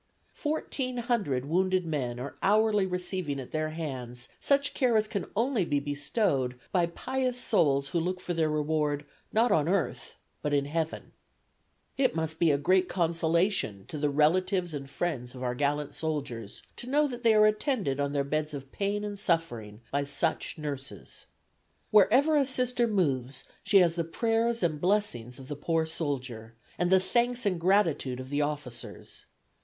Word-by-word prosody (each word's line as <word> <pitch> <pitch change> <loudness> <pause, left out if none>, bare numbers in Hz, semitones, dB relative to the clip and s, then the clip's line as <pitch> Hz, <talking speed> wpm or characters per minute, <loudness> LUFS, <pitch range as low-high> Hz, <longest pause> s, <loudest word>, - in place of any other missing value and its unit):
Fourteen 275 -5 -2
hundred 210 - 0
wounded 185 +3 +1
men 130 -7 -2
are 135 +3 -6
hourly 210 -1 +3
receiving 180 -5 -3
at 130 - -8
their 155 0 -1
hands 130 -6 -5
such 280 0 +2
care 245 -4 +3
as 215 0 +2
can 200 -3 -3
only 230 -1 +1
be 145 -4 0
bestowed 145 - -1
by 175 -3 +2
pious 255 +7 -2
souls 140 - +2
who 170 - 0
look 180 +2 -2
for 180 - -3
their 160 -2 +1
reward 150 -1 0 0.3
not 230 +2 +3
on 155 +1 +3
earth 190 -2 -1 0.3
but 150 -1 0
in 140 -1 +1
heaven. 160 +2 -3 0.9
"It 260 -8 +3
must 160 0 -2
be 170 - +4
a 145 - +3
great 185 +6 +2
consolation 170 - +1
to 150 - -5
the 150 0 +1
relatives 175 +4 +2
and 140 -2 -6
friends 135 -6 -3
of 130 - -7
our 125 -1 0
gallant 145 +2 -1
soldiers 140 -9 -4
to 240 - -8
know 295 +2 +3
that 245 -3 -6
they 225 -2 +4
are 215 0 +7
attended 215 - 0
on 140 0 0
their 140 -1 +1
beds 155 +1 -2
of 135 -1 -8
pain 205 +1 -1
and 205 -1 -5
suffering 120 - -1
by 140 0 +1
such 140 +3 -1
nurses. 140 - -7 0.6
Wherever 255 +9 +5
a 285 -2 +4
Sister 250 -2 +1
moves 135 - 0 0.2
she 200 - +4
has 170 -2 +3
the 170 0 -1
prayers 230 +6 0
and 155 -3 0
blessings 175 - 0
of 135 -1 -11
the 145 - -4
poor 160 +2 0
soldier, 130 -8 -4 0.2
and 175 - +2
the 190 0 +6
thanks 240 +5 0
and 180 -4 0
gratitude 165 -9 +2
of 130 0 -7
the 145 +1 +1
officers. 145 -5 -5
165 Hz, 170 wpm, -29 LUFS, 140-205 Hz, 0.9 s, are